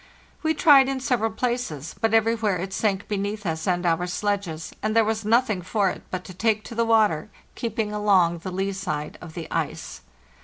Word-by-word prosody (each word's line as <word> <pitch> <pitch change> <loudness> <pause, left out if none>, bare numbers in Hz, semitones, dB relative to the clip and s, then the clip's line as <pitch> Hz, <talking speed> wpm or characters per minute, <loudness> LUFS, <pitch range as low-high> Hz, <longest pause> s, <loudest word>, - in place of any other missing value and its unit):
We 315 0 +1
tried 280 -3 +6
in 270 -1 -2
sev 255 -2 0
eral 220 0 -1
places, 235 - -2
but 225 - +2
everywhere 225 -3 +2
it 190 +2 -5
sank 200 -2 0
beneath 205 0 -3
us 160 0 -2
and 180 -1 +1
our 170 +1 +1
sledges, 180 -4 -2
and 215 +1 -1
there 225 -1 +5
was 220 0 -1
nothing 220 -2 +2
for 195 +1 +1
it - - -8
but 185 -1 -4
to 185 - -10
take 215 +3 +1
to - - -9
the 230 0 +1
water, 215 -5 +3 0.2
keeping 220 -2 -3
along 190 -5 +3
the 185 - -6
lee 195 +2 -1
side 155 -6 -4
of 165 -3 -10
the 170 -2 -5
ice. - - -3
205 Hz, 200 wpm, -24 LUFS, 180-225 Hz, 0.2 s, tried